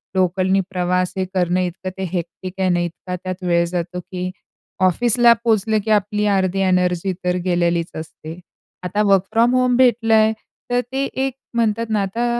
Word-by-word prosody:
लोकलनी 185 +1 +2
प्रवास 180 -1 0
हे 190 - +1
करणं 180 -1 +1
इतकं 180 +1 -4
ते 190 - -4
हेक्टिक 180 +1 -5
आहे 190 -1 +2
ना, 175 -1 +2
इतका 175 +1 -4
त्यात 185 0 -5
वेळ 170 -1 +2
जातो 175 +1 -3
की 180 0 -5 0.6
ऑफिसला 240 +5 +4
पोचलं 220 -1 +2
की 220 - 0
आपली 210 0 +1
अर्धी 190 0 0
एनर्जी 180 0 +1
तर 180 0 +1
गेलेलीच 170 -1 +1
असते. 160 +1 -8 0.4
आता 185 +4 0
वर्क 195 -2 +4
फ्रॉम 235 +2 +3
होम 250 -1 +3
भेटलंय 225 -3 +4 0.4
तर 245 0 +2
ते 270 +1 -1
एक 265 0 -1 0.2
म्हणतात 230 0 0
ना 215 -2 +1
आता 200 +5 -2
185 Hz, 165 wpm, -20 LUFS, 180-220 Hz, 0.6 s, ऑफिसला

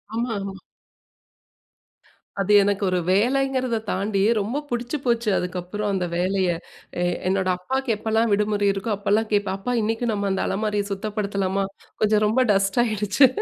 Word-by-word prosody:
ஆமா 235 +1 -1
ஆமா. 195 -1 -6 1.8
அது 200 +2 0
எனக்கு 200 0 0
ஒரு 185 - +1
வேலைங்கிறத 255 +3 +2
தாண்டி 195 +1 0 0.2
ரொம்ப 225 +8 -2
பிடிச்சு 240 +4 -2
போச்சு 235 -2 +1
அதுக்கப்புறம் 180 +3 -3
அந்த 185 -2 0
வேலையை. 185 -1 +1 0.5
எ - - +2 0.2
என்னோட 190 0 +1
அப்பாவுக்கு 265 +5 -1
எப்போலாம் 220 +1 +1
விடுமுறை 205 0 +1
இருக்கோ 200 +3 -3
அப்போலாம் 205 +2 +1
கேட்பேன், 200 -2 +1
அப்பா 245 +5 -3
இன்னைக்கு 225 +3 -1
நம்ம 200 -1 -1
அந்த 190 - 0
அலமாரிய 210 0 0
சுத்தப்படுத்தலாமா? 200 -1 -1 0.4
கொஞ்சம் 215 0 +3
ரொம்ப 220 +5 +2
டஸ்ட் 195 +2 +1
ஆயிடுச்சு. 215 +3 +3
205 Hz, 140 wpm, -23 LUFS, 195-225 Hz, 1.8 s, கொஞ்சம்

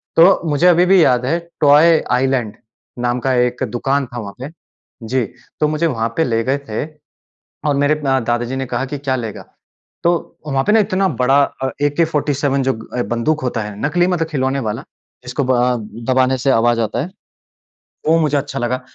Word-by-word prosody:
तो 175 +4 +6
मुझे 150 +5 +3
अभी 175 0 +5
भी 185 -2 +5
याद 125 -1 +2
है, 165 +6 +1 0.2
टॉय 155 +3 +6
आइलैंड 125 -4 0 0.4
नाम 120 0 0
का 130 +2 0
एक 125 +2 -3
दुकान 135 +3 0
था 120 - -4
वहाँ 100 -3 -7
पे। 140 +4 -7 0.6
जी, 130 +1 +1 0.4
तो 150 - +3
मुझे 155 +2 0
वहाँ 115 -5 -1
पे 160 - +3
ले 115 -3 0
गए 135 +2 0
थे। 110 +6 -2 0.8
और 145 - +2
मेरे 145 +2 +2
म 135 -1 +2
दादा 120 0 +1
जी 130 - -4
ने 135 0 -2
कहा 135 +1 -2
कि, 145 +2 -5
"क्या 135 -1 -1
लेगा?" 115 -4 -5 0.6
तो 170 - +3 0.4
वहाँ 135 -2 0
पे 210 - +2
ना 225 - +5
इतना 195 -1 +1
बड़ा 135 +3 +4 0.2
अ, 130 - 0
एके-47 145 -2 +1
जो 135 - +1 0.2
अ, 120 - +1
बंदूक 150 +7 0
होता 120 -3 -2
है, 105 -1 -6
नकली 175 +3 +2
मतलब 170 -3 0
खिलौने 135 -3 -1
वाला, 115 +6 -4 0.4
जिसको 125 +3 -2
ब 130 - +1
अ, 125 0 +2 0.4
दबाने 130 0 +3
से 135 - +3
आवाज़ 120 -1 +3
आता 115 +2 -1
है, 175 - -6 1.0
वो 165 +1 +5
मुझे 150 -2 +1
अच्छा 140 0 -4
लगा। 125 +1 -1
135 Hz, 195 wpm, -18 LUFS, 125-150 Hz, 1.0 s, तो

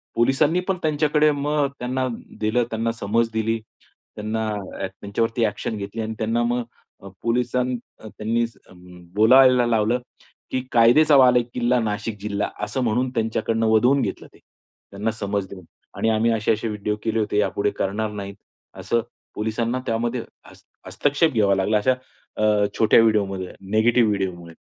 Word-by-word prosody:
पोलिसांनी 145 +8 +2
पण 190 -1 0
त्यांच्याकडे 150 0 +2
मग 145 0 0
त्यांना 130 +1 -1 0.3
दिलं, 110 +3 +1
त्यांना 115 +1 -1
समज 115 +1 0
दिली. 110 0 0 0.6
त्यांना 110 +1 -3 0.4
ॲ 95 - -2
त्यांच्यावरती 115 +5 -2
ॲक्शन 105 +2 -3
घेतली 105 +3 -5
आणि 110 0 -3
त्यांना 115 +2 0
मग 120 +1 0 0.4
अ, - - -9 0.2
पोलिसांन 125 +2 0 0.2
त्यांनी 110 +2 -2 0.7
बोलायला 125 +3 +6
लावलं 115 +1 +1 0.5
की 130 - 0
कायद्याचा 125 +6 +5
बालेकिल्ला, 125 -1 +3
नाशिक 105 -1 -3
जिल्हा 100 0 -2 0.2
असं 130 - -3
म्हणून 125 +3 +1
त्यांच्याकडून 115 0 0
वदवून 120 +5 +4
घेतलं - - -4
ते. - - -19 0.5
त्यांना 105 +3 -2
समज 100 -2 -3
देऊन 95 -2 -10 0.3
आणि 115 - +1
आम्ही 110 +1 +2
असे-असे 110 0 0
व्हिडिओ 105 -1 -2
केले 110 0 0
होते, 105 -1 -1
यापुढे 105 0 +1
करणार 105 +2 -1
नाहीत, 100 -1 -7 0.4
असं 95 +5 0 0.3
पोलिसांना 115 +3 -1
त्यामध्ये 115 +1 -1 0.3
हस्त - - -19 0.2
हस्तक्षेप 145 +3 +1
घ्यावा 100 -3 +3
लागला. 100 +3 +1
अशा 115 +5 +2 0.4
अ, 105 -1 +3
छोट्या 110 0 +6
व्हिडिओमुळे 100 -4 0 0.2
नेगेटिव्ह 115 +2 +4
व्हिडिओमुळे. 90 -4 -3
115 Hz, 140 wpm, -23 LUFS, 105-125 Hz, 0.7 s, बोलायला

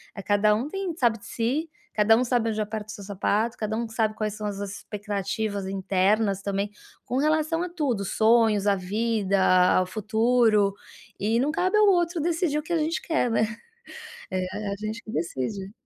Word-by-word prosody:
Eh, 200 - -6
cada 205 +1 +3
um 230 +6 -1
tem 380 -2 -3
sabe 235 -5 +2
de 200 - -15
si, 250 +9 -2 0.2
cada 225 +3 +4
sabe 240 -2 +1
onde 215 0 -1
aperta 210 0 -4
o - - -7
seu 205 - -9
sapato, 210 +4 -1
cada 215 0 -2
que 225 - -13
sabe 220 -1 +1
quais 215 -1 -2
são 210 -1 -4
as 200 -1 -4
expectativas 205 0 -4
internas 195 +1 +1
também, 200 +1 -2 0.3
com 250 - -2
relação 310 +3 +1
a - - -2
tudo, 275 - -1
sonhos, 220 -1 +3
a 200 - +4
vida, 200 +1 0 0.4
ao 185 - +2
futuro, 220 0 +2 0.5
e 220 +3 +1
não 285 +3 +1
cabe 370 +6 +1
ao 425 -1 +5
outro 345 -3 +2
decidir 330 -2 0
o - - -6
que 330 - -9
a - - +3
gente 315 +1 -1
quer, 320 -7 0
né? - - +2 0.9
É 185 -1 -1 0.3
a - - -2
a - - -3
gente 215 +3 -5
que 215 - -10
decide. 170 +6 -3
220 Hz, 190 wpm, -25 LUFS, 200-250 Hz, 0.9 s, ao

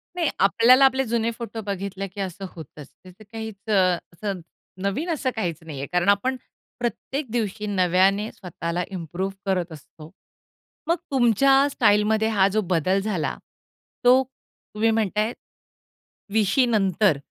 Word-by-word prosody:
नाही, 335 -4 +1
आपल्याला 235 +7 +6
आपले 265 0 +3
जुने 230 0 0
फोटो 230 -1 -6
बघितले 195 0 -4
की 195 +1 -7
असं 195 +1 -5
होतंच. 150 -3 -11 0.2
ते 185 +4 -14
काहीच 220 -1 -9
अ, 185 -4 +3 0.2
असं, 195 +1 -4 0.4
नवीन 255 - -2
असं 275 -4 -1
काहीच 175 -8 -2
नाही 155 -4 -8
आहे 140 - -4
कारण 180 +2 +2
आपण 255 +6 +2 0.4
प्रत्येक 265 +4 -3
दिवशी 215 -3 -2
नव्याने 195 +2 +2
स्वतःला 175 -1 -4
इम्प्रूव्ह 185 +2 -4
करत 180 -3 -1
असतो. 155 +1 -13 0.8
मग 335 - +3 0.2
तुमच्या 270 +3 +4
स्टाईलमध्ये 215 +1 +3
हा 190 - +5
जो 215 - +2
बदल 185 +3 +2
झाला 190 -7 -2 0.7
तो 255 +2 +7
तुम्ही 225 -3 -4
म्हणतायत 215 +1 0 1.0
20शी 220 +4 +3
नंतर 195 - +2
205 Hz, 135 wpm, -24 LUFS, 185-230 Hz, 1.0 s, तो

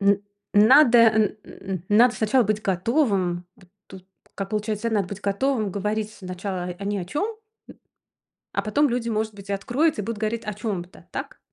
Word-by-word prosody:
н 200 0 +3 0.3
надо, 240 +4 +7
н 220 -1 +6 0.2
н 195 - -11
н 180 -3 -3
надо 235 +4 +5
сначала 235 +4 +2
быть 215 +1 -1
готовым? 190 - 0
Вот 185 - -21 0.2
тут 185 -1 -12 0.3
как 195 -1 -5
получается: 215 +1 -2
надо 205 -5 0
быть 200 0 -7
готовым, 215 +1 0
говорить 210 +2 -2
сначала 185 -1 -5
о 180 +2 -6
ни 205 0 -1
о 180 - -4
чём, 290 - -2
м, 450 -1 -7 1.2
а - - 0
потом 285 +7 +2
люди, 235 -1 -1
может 215 0 -1
быть, 200 0 -12
и - - 0
откроются 245 +7 0
и - - -5
будут 225 -1 -4
говорить 220 +1 -2
о 210 - -3
чём-то. 195 -4 -6
Так? - - -6
210 Hz, 185 wpm, -24 LUFS, 195-230 Hz, 1.2 s, надо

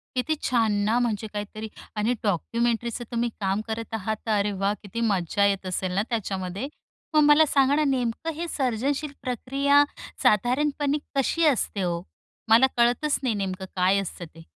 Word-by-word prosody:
किती 255 +5 +1
छान 230 -4 +2
ना, 220 +3 +2
म्हणजे 225 -3 -1
काहीतरी 210 +1 -5 0.3
आणि 215 +3 +1
डॉक्युमेंटरीचं 235 +4 -1
तुम्ही 235 0 0
काम 195 +1 0
करत 225 0 -4
आहात, 220 0 -2
तर - - -1
अरे 205 +1 0
वाह! 195 +1 0
किती 210 +3 -6
मजा 200 -2 +1
येत 195 -1 0
असेल 185 0 -2
ना 195 - +2
त्याच्यामध्ये. 195 0 -3 0.5
मग 305 - +6
मला 295 +2 +7
सांगा 275 -1 +3
ना, 305 +1 +2
नेमकं 265 +3 -1
हे 340 +3 -4
सर्जनशील 275 +2 -1
प्रक्रिया 275 +3 +2 0.4
साधारणपणे 280 +6 +2 0.2
कशी 300 +5 +2
असते 235 -8 +1
हो? 170 -1 -1 0.5
मला 230 +4 +7
कळतच 245 +5 +2
नाही 245 -5 0
नेमकं 190 -1 -3
काय 185 +2 +3
असतं 185 -2 -6
ते? 165 - -13
230 Hz, 160 wpm, -25 LUFS, 200-270 Hz, 0.5 s, मला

